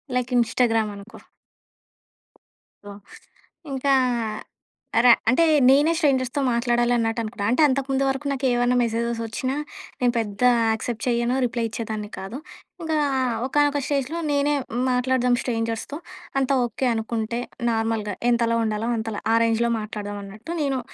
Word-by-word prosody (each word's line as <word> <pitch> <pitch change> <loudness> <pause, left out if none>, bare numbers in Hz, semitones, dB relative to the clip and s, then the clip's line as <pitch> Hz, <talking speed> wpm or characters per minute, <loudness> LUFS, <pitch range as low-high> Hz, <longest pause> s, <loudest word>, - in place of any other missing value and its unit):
Like 250 0 -1
Instagram 230 -2 +2
అనుకో. 200 +2 -12 1.7
So 205 - -10 0.8
ఇంకా 275 +1 0 1.1
అర 245 - +5 0.2
అంటే 295 +6 +4 0.3
నేనే 290 +4 +5
స్ట్రేంజర్స్‌తో 275 -3 +1
మాట్లాడాలి 240 0 +1
అన్నట్టు 225 0 0
అనుకుంటా. 215 -2 -4
అంటే 255 - +2
అంతకుముందు 270 0 0
వరకు 270 +2 -3
నాకేమన్నా 250 -2 +1
మెసేజెస్ 235 0 -1
వచ్చినా 255 +4 -3 0.4
నేను 245 -1 +2
పెద్ద 205 0 -5 0.3
యాక్సెప్ట్ 220 0 -3
చేయను. 240 +1 +1
రిప్లై 235 0 -2
ఇచ్చేదాన్ని 215 -2 -5
కాదు. 195 +7 -6 0.4
ఇంకా 320 -1 -1 0.5
ఒకానొక 290 +1 +2
స్టేజ్‍లో 285 +3 -1
నేనే 290 +1 +2 0.3
మాట్లాడదాం 250 0 +2
స్ట్రేంజర్స్‌తో 230 +3 -3 0.4
అంతా 270 0 +1
ఓకే 245 +3 -2
అనుకుంటే 225 +1 -2 0.3
నార్మల్‍గా 225 -3 -1 0.2
ఎంతలో 230 -1 +2
ఉండాలో 220 +1 -1
అంతలో. 220 -1 -4
ఆ - - +5
రేంజ్‌లో 230 +1 +1
మాట్లాడదాం 205 -1 -6
అన్నట్టు 215 +11 -8
నేను 275 -3 0
240 Hz, 125 wpm, -23 LUFS, 225-265 Hz, 1.7 s, అర